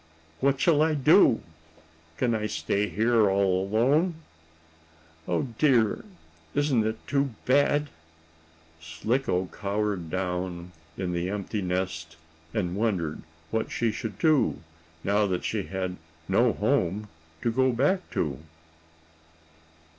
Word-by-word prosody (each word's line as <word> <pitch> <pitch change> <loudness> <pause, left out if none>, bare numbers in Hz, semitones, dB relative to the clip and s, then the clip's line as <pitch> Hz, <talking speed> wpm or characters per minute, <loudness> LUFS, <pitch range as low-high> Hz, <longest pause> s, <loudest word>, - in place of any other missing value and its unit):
What 135 0 +2
shall 155 -2 +4
I 155 0 +3
do? 145 - +5 0.8
Can 120 -2 +1
I 105 -1 -1
stay 105 -1 -1
here 110 -1 +3
all 95 -1 +2
alone? 140 - +2 1.1
Oh, 85 - +1 0.2
dear! 125 -8 +3 0.5
Isn't 140 -7 +2
it 110 - -2
too 140 -3 0
bad!" 145 +2 +3 0.9
Slicko 90 - -1
cowered 100 -4 -2
down 90 -1 -3 0.3
in 90 -2 -2
the 85 +1 -1
empty 105 +1 -3
nest 90 -3 -3 0.3
and 90 -3 -1
wondered 95 -8 -1 0.3
what 110 0 -1
she 115 -2 0
should 105 -2 -5
do, 155 -4 +3 0.5
now 105 +1 +2
that 90 -2 -2
she 105 -3 -1
had 95 -1 -3 0.3
no - - +3
home 105 +5 0 0.4
to 115 - +2
go 130 +2 +3
back 145 +11 +1
to. 70 -5 -2
105 Hz, 115 wpm, -27 LUFS, 90-130 Hz, 1.1 s, do